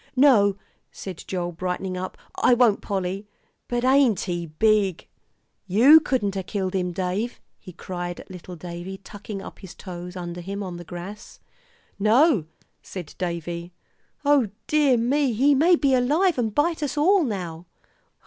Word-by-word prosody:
"No," 220 -8 +5 0.3
said 185 -4 -8
Joel, 175 -2 -2
brightening 185 +2 -3
up, 185 +1 -5 0.2
"I 250 - +4
won't, 235 -4 +3
Polly. 195 +1 -3 0.4
But 240 0 -1
ain't 260 -6 +4
he 175 -2 -3
big! 200 +2 +1 0.6
You 245 - +8
couldn't 245 -10 -1
a 190 - -1
killed 190 -1 -3
him, 180 -2 -1
Dave," 190 +6 -2 0.2
he 185 - -11
cried 175 0 -6
at - - -12
little 180 0 -9
Davie 175 +3 -7
tucking 200 0 -8
up - - -10
his 190 -2 -11
toes 180 -1 -8
under 175 -1 -6
him 200 +3 -5
on 180 -2 -6
the 175 - -8
grass. 175 +5 -9 0.6
"No," 225 - +4 0.4
said 175 -6 -8
Davie. 170 0 -4 0.5
"O 285 -6 +4 0.2
dear 290 -5 +3
me, 260 +3 +1
he 275 +6 +4
may 330 +6 +5
be 280 -5 +2
alive 295 +6 +2
and 220 -3 -1
bite 325 +2 +1
us 290 -1 -2
all 365 +5 +4
now." 180 - -4
200 Hz, 155 wpm, -24 LUFS, 180-255 Hz, 0.6 s, You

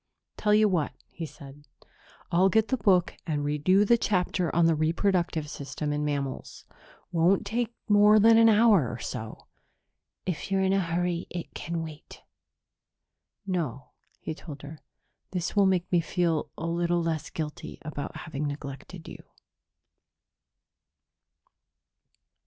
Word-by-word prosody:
"Tell 210 - 0
you 215 0 +5
what," 175 -7 0 0.2
he 165 - -6
said. 145 -1 -14 0.6
"I'll 185 +3 +4
get 220 +2 +2
the 260 - +2
book 185 -5 +3
and 145 -2 -1
read 150 +3 -2
you 195 +2 +6
the 235 +2 +4
chapter 180 -4 0
on 170 0 +4
the 165 - +4
reproductive 165 0 0
system 145 +1 -4
in 150 0 -1
mammals. 140 -2 -4 0.5
Won't 180 +4 +3
take 235 +2 -2
more 210 0 +6
than 225 +1 +6
an 225 0 +7
hour 210 - +5
or 120 - -5
so." 110 -1 -7 0.8
"If 180 0 -3
you're 195 0 +1
in 190 0 +2
a 195 - +3
hurry, 175 0 -1
it 175 -1 -6
can 170 -1 -4
wait." 155 -2 -11 1.2
"No," 160 - -3 0.3
he - - -5
told 150 -2 -10
her. 150 +1 -9 0.5
"This 180 +1 -2
will 200 -1 +5
make 185 -2 0
me 175 -2 +4
feel 165 -1 0
a 165 - -4
little 170 0 0
less 160 -3 -2
guilty 155 -2 -6
about 145 -2 -5
having 150 -1 -3
neglected 145 +4 -8
you." - - -10
170 Hz, 140 wpm, -27 LUFS, 150-195 Hz, 1.2 s, an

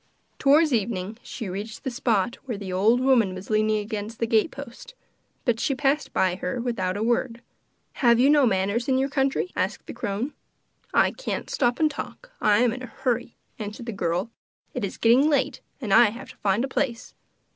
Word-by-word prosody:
Towards 300 +1 +5
evening 215 -1 -2
she 225 - -6
reached 205 +4 -6
the 265 - -2
spot 240 -4 +1
where 240 -5 -4
the 195 -2 -6
old 220 +7 +3
woman 240 -8 +3
was 185 +3 -8
leaning 215 0 +2
against 210 +1 -4
the 230 - 0
gate 225 +5 +2
post, 280 - -10 0.5
but 235 -2 +1
she 275 - 0
passed 280 +2 +1
her - - -29
by 180 +1 0
without 205 -6 -1
a 210 - -1
word. 235 0 0 0.5
'Have 235 -2 +4
you 260 - +5
no 290 -3 +5
manners 200 +3 0
in 260 -1 +3
your 270 +1 +1
country?' 275 +5 0
asked - - -2
the - - -7
crone. 210 +8 -3 0.6
'I - - +4
can't - - -5
stop 245 -2 +1
and 310 -1 +3
talk; - - -8
I 205 -1 +4
am 245 -2 +3
in 255 - -7
a 255 - -6
hurry,' 240 -1 -2 0.2
answered 215 +2 -6
the 235 - -3
girl. 180 +2 -2 0.4
'It 250 - -3
is 200 - -4
getting 250 +6 +5
late, 275 -4 0 0.2
and 220 -7 -1
I 235 -1 +7
have 245 +4 -9
to - - -19
find 205 +3 +1
a - - -5
place. 250 -3 -2
235 Hz, 200 wpm, -25 LUFS, 205-265 Hz, 0.6 s, I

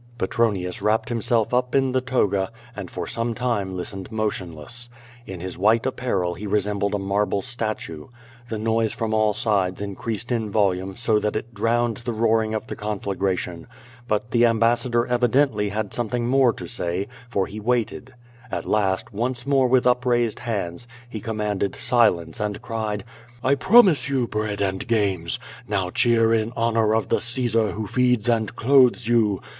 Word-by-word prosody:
Petronius 95 -4 0
wrapped 110 +1 +1
himself 115 -1 0
up 125 +1 +1
in 135 -1 +3
the 130 0 +1
toga 105 -6 0 0.2
and 100 -3 -6
for 90 -2 -5
some 115 +5 -2
time 105 -7 -1
listened 95 +3 -6
motionless. 110 +1 -4 0.4
In 95 -2 -7
his 90 0 -6
white 110 +4 +3
apparel 100 -9 -1
he 100 +5 -7
resembled 100 0 0
a - - +1
marble 100 0 0
statue. 110 -10 -4 0.4
The 110 - -3
noise 110 0 0
from 110 -2 -2
all 110 -1 +2
sides 95 -4 0
increased 105 +4 -4
in 115 -3 0
vol 100 -2 +3
ume 95 +1 -6
so 110 -3 +2
that 105 0 -2
it 115 +2 -4
drowned 115 +2 +1
the 120 0 -4
roaring 110 0 +1
of 110 - -3
the - - -6
conflagration. 95 -4 -3 0.4
But 105 +1 -1
the 120 0 +5
ambassador 120 +1 +2
evidently 125 -3 +2
had 105 0 -3
something 120 0 -1
more 130 0 +4
to - - -8
say, 90 -3 -2 0.2
for 100 -5 0
he 105 - -8
waited. 120 +3 -1 0.4
At - - -4
last, 100 0 0
once 120 +3 -2
more 135 -2 +3
with 125 0 +3
upraised 125 -2 +2
hands, 100 -2 -4 0.2
he 110 - -5
com 110 0 -4
manded 105 -2 -1
silence 90 -10 +2
and 105 -1 -2
cried: 110 -3 -3 0.4
"I 130 - +3
promise 170 - +5
you 130 -4 +1
bread 105 -2 -2
and 95 -1 -1
games. 100 -7 0 0.3
Now 95 -3 -1
cheer 115 0 +3
in 115 +1 0
honor 115 -1 +2
of 110 - -1
the - - +2
Caesar 115 -3 +1
who 110 +1 -4
feeds 125 +1 +1
and 115 -3 +1
clothes 125 -2 +4
you. 110 -5 +2
110 Hz, 170 wpm, -23 LUFS, 100-120 Hz, 0.4 s, the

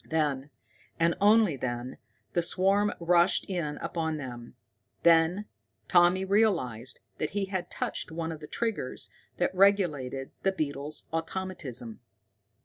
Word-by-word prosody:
Then, 150 -3 0 0.5
and 165 0 +4
only 210 -5 +5
then, 125 -1 -4 0.3
the 175 - +2
swarm 195 +4 +2
rushed 175 +1 +3
in 165 -6 -2
upon 160 -2 -2
them. 120 -4 -8 0.5
Then 170 +4 +4 0.4
Tommy 175 +2 +4
realized 175 - +1 0.2
that 155 - -1
he 200 - +1
had 190 -2 -3
touched - - -3
one 165 0 -3
of 160 - -6
the 150 - -9
triggers 225 - -3 0.3
that - - +1
regulated 160 -10 +2
the 195 - +2
beetle's 150 -3 -4
automatism. 165 - -3
165 Hz, 125 wpm, -29 LUFS, 140-190 Hz, 0.5 s, only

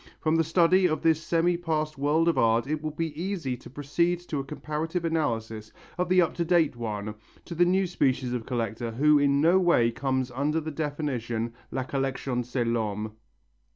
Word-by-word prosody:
From 155 0 +1
the 165 - +3
study 175 +3 +4
of 155 -2 -2
this 160 -1 +3
semi 170 +1 +1
past 155 -3 -2
world 150 +4 +1
of 170 - +3
art 115 +1 +3
it 150 +2 -2
will 155 - -2
be 155 +1 -3
easy 175 -9 -2
to - - -13
proceed 160 +6 0
to 160 -4 -4
a - - -2
comparative 155 +4 -4
analysis 115 -9 -2 0.2
of 180 0 -1
the 185 -1 +5
up 165 - -2
to 170 - +1
date 165 -5 +2
one, 110 -3 -4 0.3
to 175 - -7
the 175 +1 +3
new 190 +2 +2
species 130 -7 0
of 120 -2 -4
collector 115 -2 -2
who 145 +6 +4
in 140 0 +3
no 170 +4 +5
way 145 -11 +3
comes 130 +1 -1
under 145 +5 0
the 160 0 -5
definition 130 -7 -3 0.2
"La 130 - -2
collection 135 -2 -2
c'est 120 0 -2
l'homme." 110 -2 -2
145 Hz, 190 wpm, -27 LUFS, 120-165 Hz, 0.3 s, the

